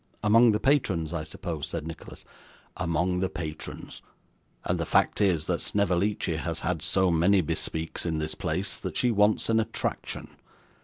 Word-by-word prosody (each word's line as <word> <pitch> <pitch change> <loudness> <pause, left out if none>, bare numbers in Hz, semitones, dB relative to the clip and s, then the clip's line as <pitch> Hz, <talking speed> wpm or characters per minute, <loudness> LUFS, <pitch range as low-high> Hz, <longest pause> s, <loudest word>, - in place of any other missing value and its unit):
'Among 115 +2 +6
the 105 - +1
patrons, 105 - +1
I 80 -3 -2
suppose?' 80 -1 -5
said 80 -2 -4
Nicholas. 80 0 -9 0.5
'Among 90 +2 0
the 95 0 0
patrons; 80 -1 -7 0.6
and - - 0
the - - -1
fact - - +2
is, 90 -6 +2
that - - -1
Snevellicci 100 -3 0
has 80 0 -3
had 85 -3 -1
so 95 +2 +2
many 90 +4 +4
bespeaks 80 0 -3
in 80 -2 -1
this 80 0 -2
place, 90 +6 -3
that - - -5
she 125 - +2
wants 105 0 +3
an 115 0 +3
attraction. 110 0 -3
90 Hz, 160 wpm, -27 LUFS, 80-105 Hz, 0.6 s, Among